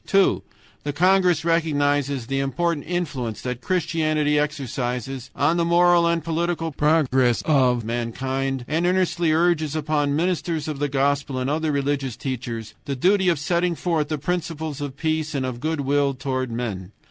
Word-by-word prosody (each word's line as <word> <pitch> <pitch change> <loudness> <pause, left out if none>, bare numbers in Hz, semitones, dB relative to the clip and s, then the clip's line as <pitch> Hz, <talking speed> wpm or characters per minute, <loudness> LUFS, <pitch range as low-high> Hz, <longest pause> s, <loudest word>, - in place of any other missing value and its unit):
"2. 195 -1 +3 0.4
The 145 - -3
congress 180 0 +3
recognizes 145 -5 +1
the 135 +2 -1
important 145 +4 -1
influence 145 -11 -3
that 125 -1 -4
Christianity 155 -2 +1
exercises 130 -3 -3
on 155 +4 +2
the 170 - +2
moral 170 0 +4
and 170 -1 +1
political 165 0 -1
progress 135 -5 +2
of 125 -6 +2
mankind, 130 +3 -2
and 165 +3 +1
earnestly 175 -3 +1
urges 160 -2 +2
upon 145 -2 0
ministers 165 -2 -1
of 150 -3 -4
the 145 0 0
Gospel 140 0 0
and 130 +2 -1
other 155 0 0
religious 140 -3 -1
teachers 120 -4 -5
the 140 - -2
duty 190 +6 +3
of 170 - +2
setting 170 +4 0
forth 165 -3 0
the 155 - -2
principles 160 -2 -3
of 140 -1 -5
peace 155 -1 -1
and 130 -3 -2
good 155 +2 -1
will 140 0 +1
toward 130 -1 -2
men. 105 -5 -4
145 Hz, 155 wpm, -23 LUFS, 135-165 Hz, 0.4 s, moral